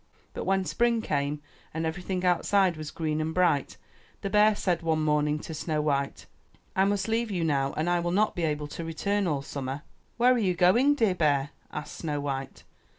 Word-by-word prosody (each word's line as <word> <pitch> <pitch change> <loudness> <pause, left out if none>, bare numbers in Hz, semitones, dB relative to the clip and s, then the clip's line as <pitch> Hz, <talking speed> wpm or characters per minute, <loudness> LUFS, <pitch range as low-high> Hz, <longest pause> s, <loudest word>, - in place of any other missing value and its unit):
But - - -5
when 190 -1 +1
spring 230 +8 +1
came 145 -2 -1 0.3
and 160 0 -1
everything 180 +2 -3
outside 180 +1 +3
was 155 -1 -6
green 155 -1 -2
and 160 +1 -3
bright, 175 -6 +2 0.4
the 195 - -3
bear 210 +1 +5
said 180 -4 0
one 160 -2 0
morning 150 0 +2
to 160 - -7
Snow 155 0 -2
white, 140 -2 -1 0.5
''I 190 +1 +3
must 200 -1 0
leave 225 +1 0
you 180 -4 -1
now 140 -3 +1
and 155 +2 0
I 175 0 +2
will 175 0 -1
not 210 +4 +2
be 175 - -3
able 150 -2 -1
to 165 - -6
return 200 +5 -1
all 145 -4 -1
summer/' 135 0 -5 0.4
''Where 250 +2 +6
are 250 - +1
you 185 -5 +1
going, 235 +12 +4
dear 225 -8 +2
bear?'' 145 -5 +1 0.2
asked 150 -1 -6
Snow 150 -3 -2
white. 135 -2 -4
165 Hz, 200 wpm, -28 LUFS, 150-195 Hz, 0.5 s, Where